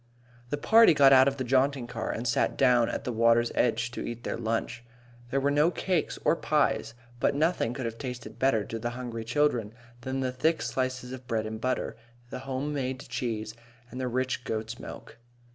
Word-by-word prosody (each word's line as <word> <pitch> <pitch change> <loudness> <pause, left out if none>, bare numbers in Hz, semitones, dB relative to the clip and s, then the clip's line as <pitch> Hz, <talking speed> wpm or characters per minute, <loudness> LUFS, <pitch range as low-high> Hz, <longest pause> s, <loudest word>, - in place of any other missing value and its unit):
The 145 - -1
party 220 +2 +6
got 135 -1 +7
out 130 0 +7
of 140 0 0
the 130 - -2
jaunting 135 +1 +2
car 115 -2 -5
and 120 +2 -3
sat 120 - +1
down 125 -3 +4
at - - -3
the 125 - -2
water's 115 +1 +3
edge 120 0 +1
to - - -6
eat 120 0 -6
their - - -2
lunch. 115 +1 -2 0.5
There 135 - +1
were 140 +1 +1
no 150 +3 +4
cakes 180 -2 -1
or - - +4
pies, 150 -8 0 0.2
but 140 - +2
nothing 150 -6 +1
could 130 - -4
have 115 0 -5
tasted 125 -3 -7
better 130 -5 +2
to 115 - -5
the 120 +2 -2
hungry 120 -3 -5
children 120 -3 0 0.3
than 130 +2 -3
the 130 -1 -1
thick 155 +6 +1
slices 130 -1 -2
of 130 -1 -9
bread 110 -2 -1
and 110 0 -6
butter, 130 -2 -2 0.3
the - - -5
home 135 +2 -3
made 130 -2 -3
cheese, 115 -4 -3 0.4
and 130 - -5
the 130 - -1
rich 130 0 -1
goat's 110 -1 -4
milk. - - -10
125 Hz, 200 wpm, -28 LUFS, 115-135 Hz, 0.5 s, got